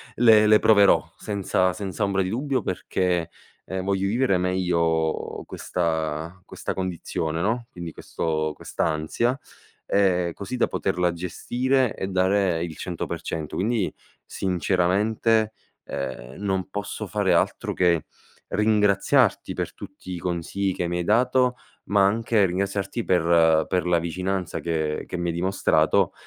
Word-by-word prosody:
le 110 -2 +6
le 105 0 +6
proverò, 100 -3 +5
senza 95 -3 0
senza 95 -3 -4
ombra 100 -1 +1
di 95 - -1
dubbio, 130 +3 -1
perché, 90 -3 -1 0.4
ehm, 95 -1 -4
voglio 100 0 0
vivere 115 -3 +2
meglio 85 -3 0
questa 80 0 -3
questa - - -5
condizione, 85 -3 -3
no, 115 +5 -1
quindi 85 -2 -7
questo 80 -1 -2
quest'ansia. 80 - -1 0.5
Ehm, 90 -4 +2
così 100 +5 -6
da - - +2
poterla 90 -2 0
gestire 125 +8 0
e 95 - -3
dare 95 -2 +1
il 85 -2 -5
100%. 80 -3 -4
Quindi, 105 0 0 0.3
sinceramente, 100 +5 +1 0.3
ehm, 65 -2 -5
non 95 -2 -1
posso 100 +1 -4
fare - - +1
altro - - 0
che 85 -4 +2 0.4
ringraziarti 105 -2 +2
per - - -4
tutti 95 -2 -10
i 85 - -5
consigli 90 +3 -2
che 90 - -2
mi 90 0 -2
hai - - -1
dato, 125 +5 +3 0.3
ma 100 -1 +3
anche 110 0 +2
ringraziarti 100 +4 -2
per 85 -3 +4
per 90 -2 0
la 85 -1 +3
vicinanza 90 +2 -3
che 80 -2 -1
che - - -5
mi 85 0 -2
hai 85 - -1
dimostrato, 95 +3 +2
95 Hz, 130 wpm, -24 LUFS, 85-105 Hz, 0.5 s, le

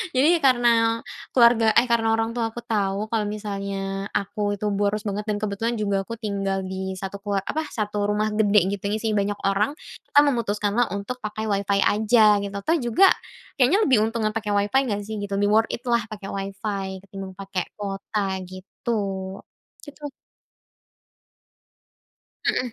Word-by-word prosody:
Jadi, 270 +5 +5
karena 235 -3 +3 0.3
keluarga, 235 -2 +6
eh, 235 - +6
karena 225 -1 +3
orang 225 0 0
tua 230 -2 0
aku 240 +2 -8
tahu 200 -1 0
kalau 220 -2 +1
misalnya 195 -1 -4
aku 205 +1 -2
itu 210 - -4
boros 205 +1 0
banget 205 +1 -2
dan 210 - 0
kebetulan 215 +3 -1
juga 200 -2 0
aku 230 +2 -6
tinggal 195 -3 -2
di 190 0 -4
satu 195 +1 -5
kelua 200 -1 -1
apa, 315 - -1
1 205 -2 -2
rumah 210 +1 +1
gede, 210 -1 +4
gitu 200 - -6
ya 210 - 0
sih, 220 0 -1
isi - - +1
banyak 200 0 0
orang, 205 +9 +1 0.3
kita - - +5
memutuskanlah 230 -3 +1
untuk 200 +6 -5
pakai 215 +1 -4
Wi-Fi 200 0 +1
aja, 215 -1 +4
gitu. 200 0 -5
Toh, 330 - +3
juga 240 - +4 0.5
kayaknya 330 - +4
lebih 255 -5 +4
untungan 225 -1 -1
pakai 215 -2 -2
Wi-Fi 205 +6 +3
nggak 205 -1 -1
sih, 220 - -4
gitu, 200 -1 -3
lebih 205 +1 +2
worth 225 - -10
it 235 - -5
lah 235 -1 +2
pakai 210 -2 -8
Wi-Fi 195 0 -4 0.2
ketimbang 195 -1 -8
pakai 195 -2 -3
kuota, 195 -1 -3
gitu. 185 +5 -7 0.9
Gitu. 290 0 -8 2.4
Heeh. 250 -2 0
210 Hz, 165 wpm, -24 LUFS, 200-230 Hz, 2.4 s, keluarga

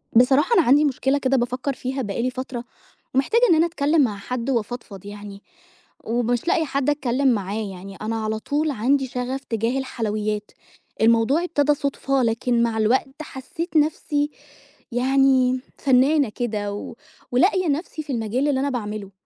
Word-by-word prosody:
بصراحة 270 - +5
أنا 430 - +6
عندي 290 +1 +4
مشكلة 270 0 +1
كده 270 -1 +1
بافكّر 250 +3 -1
فيها 265 +1 -4
بقى 205 -1 -3
لي 250 - +1
فترة 255 -1 -5 0.5
ومحتاجة 275 - +2
إن 335 - +6
أنا 320 +1 +4
اتكلِّم 310 -1 +2
مع 220 -7 +1
حد 245 +5 -4
وافضفض 225 -5 -3
يعني، 205 -1 -9 0.6
ومش 240 +3 -1
لاقية 330 -2 +2
حد 275 -1 -1
أتكلِّم 275 -2 +1
معاه، 210 -3 0
يعني 195 +2 -10
أنا 220 +1 -3
على 215 0 -2
طول 295 +6 -1
عندي 265 +3 +1
شَغَف 255 +2 -4
تجاه 230 +3 -1
الحلويات، 215 -4 -3 0.5
الموضوع 230 +8 +4
ابتدى 295 -4 +2
صُدفة 275 -2 -1
لكن 235 +1 +1
مع 230 -1 0
الوقت 260 +6 +1
حسّيت 310 +4 -4
نَفْسي 295 -1 +1 0.6
يعني 260 0 +3 0.2
فنّانة 275 +1 +3
كده 210 -3 -3
و 205 - -7 0.4
ولاقية 370 - +3
نَفْسي 310 +1 -2
في 290 - -5
المجال 235 +4 -1
اللي 270 -2 +1
أنا 280 +1 0
باعمله، 210 -5 -4
255 Hz, 155 wpm, -23 LUFS, 225-280 Hz, 0.6 s, أنا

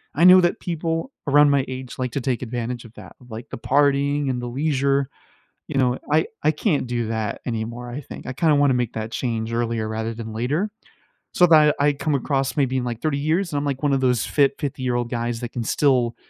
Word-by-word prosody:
I 165 - +2
know 185 0 +9
that 175 - +1
people 165 - -3 0.2
around 145 +1 +6
my 140 -2 +2
age 130 -1 -7
like 125 -2 -2
to 140 - -1
take 125 -1 -1
advantage 120 0 -4
of 115 - -14
that, - - -12
like 110 +2 -8
the - - -6
partying 140 +1 +2
and 125 -1 -2
the 120 - -4
leisure, 140 0 0 0.6
you - - -3
know? 125 -1 +2
I 155 +1 +3 0.2
I 155 - +4
can't 150 - 0
do 120 -2 -2
that 110 -2 -3
anymore, 120 +1 -4
I 130 +5 -5
think. - - -10
I 130 - -3
kinda 155 +1 +3
wanna 145 -2 +4
make 120 -2 -1
that 110 0 -5
change 115 -2 -2
earlier 115 -2 -1
rather 110 +1 -3
than 110 -1 -7
later, 150 - -1 0.6
so 180 - +5
that 155 -2 +6
I 145 0 +3
come 145 +1 -1
across 135 +1 -1
maybe 130 -2 +1
in, 125 - -1
like, 120 -1 -4
30 155 -3 0
years, 165 +3 0
and - - 0
I'm - - -3
like 140 -1 -2
one 145 -1 +2
of 135 - +1
those 125 -4 +2
fit 140 -2 +2
50-year-old 135 -3 -3 0.2
guys 120 -1 -2
that 120 - -4
can 120 - -3
still 125 -2 +2
130 Hz, 225 wpm, -22 LUFS, 120-145 Hz, 0.6 s, know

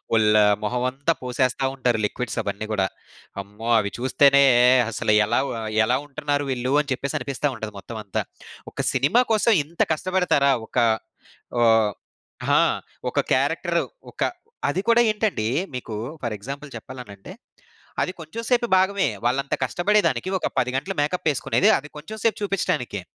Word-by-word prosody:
ఓల్లు 105 -1 +5 0.2
మొహం 125 +4 -1
అంతా 140 +6 -1
పోసేస్తా 130 +1 0
ఉంటారు 125 -4 0
లిక్విడ్స్ 125 +3 -4
అవన్నీ 100 +2 -4
గూడా. 95 -3 +1 0.6
అమ్మో! 105 +4 -8
అవి 100 -1 -2
చూస్తేనే 140 +2 +5 0.5
అసల 105 -1 -1
ఎలావు 130 +6 0
ఆహ్, 110 -1 -4
ఎలా 125 +2 +2
ఉంటున్నారు 145 0 -2
వీళ్ళు 130 +2 -1
అని 145 -2 -8
చెప్పేసనిపిస్తా 140 +1 -2
ఉంటది 110 -1 -6
మొత్తం 110 +2 -8
అంతా. 100 - -2 0.5
ఒక - - -13
సినిమా 145 - +3
కోసం 220 +2 +3
ఇంత 165 +4 -6
కష్టపడతారా 155 -5 +2
ఒక - - -8 0.8
ఓ - - +3 1.0
ఆ! - - +6 0.5
ఒక - - -1
క్యారెక్టర్ 165 +5 +1 0.3
ఒక - - -14 0.5
అది 190 - -1
కూడా 235 +1 +5
ఏంటండి 210 - 0 0.3
మీకు 115 -3 -5 0.3
ఫర్ 115 -3 -2
ఎగ్జాంపుల్ 140 +8 -7
చెప్పాలనంటే, 120 - -10 0.7
అది 185 - -1
కొంచెం 165 +9 -7
సేపు 240 -1 +3
భాగమే 190 -3 +2 0.2
వాళ్ళంత 135 +3 0
కష్టపడేదానికి, 195 +6 +1
ఒక - - -1
10 125 0 +1
గంటలు 190 +8 -3
మేక‌ప్పేసుకునేది 145 -6 +1
అది 150 +2 -11
కొంచెం 190 +9 -8
సేపు 225 - +2
జూపించటానికే. 125 - -1
135 Hz, 140 wpm, -23 LUFS, 120-170 Hz, 1.0 s, ఆ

